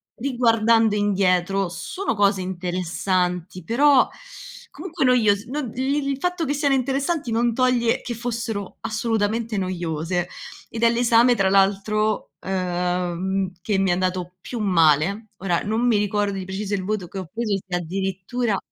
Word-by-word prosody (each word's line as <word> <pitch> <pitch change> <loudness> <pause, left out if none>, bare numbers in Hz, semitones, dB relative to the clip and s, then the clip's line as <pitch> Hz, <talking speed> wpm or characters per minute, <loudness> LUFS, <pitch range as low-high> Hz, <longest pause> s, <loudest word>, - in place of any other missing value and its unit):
riguardando 230 -3 +2
indietro, 195 -2 +1
sono 180 - -3
cose 200 -1 +3
interessanti, 180 0 -2
però 270 - +4 0.6
comunque 335 -6 -3
noios 215 -5 +3
non 270 0 -3
li 275 +2 0
il 275 - -1
fatto 355 +1 -1
che 285 - 0
siano 285 -1 +1
interessanti 275 +2 -1
non 235 +1 +1
toglie 245 -1 +2
che 245 - -4
fossero 230 -4 -4
assolutamente 220 0 -1
noiose, 175 -2 -2 0.4
ed 230 0 -4
è 230 - +7
l'esame 235 +1 +4
tra 195 -3 +2
l'altro, 205 +2 +1
ehm, 180 0 -1
che 205 0 0
mi 195 - +2
è - - +4
andato 180 0 -2
più 240 - -6
male. 180 +2 +2
Ora 180 -3 0
non 225 +4 0
mi 235 - +4
ricordo 205 0 0
di 190 - -5
preciso 195 +2 -4
il 190 - -3
voto 205 -3 -2
che 195 - -7
ho 180 -3 -7
preso, 220 -3 -1
se 180 - -2
addirittura 195 +5 -2
205 Hz, 145 wpm, -23 LUFS, 185-235 Hz, 0.6 s, è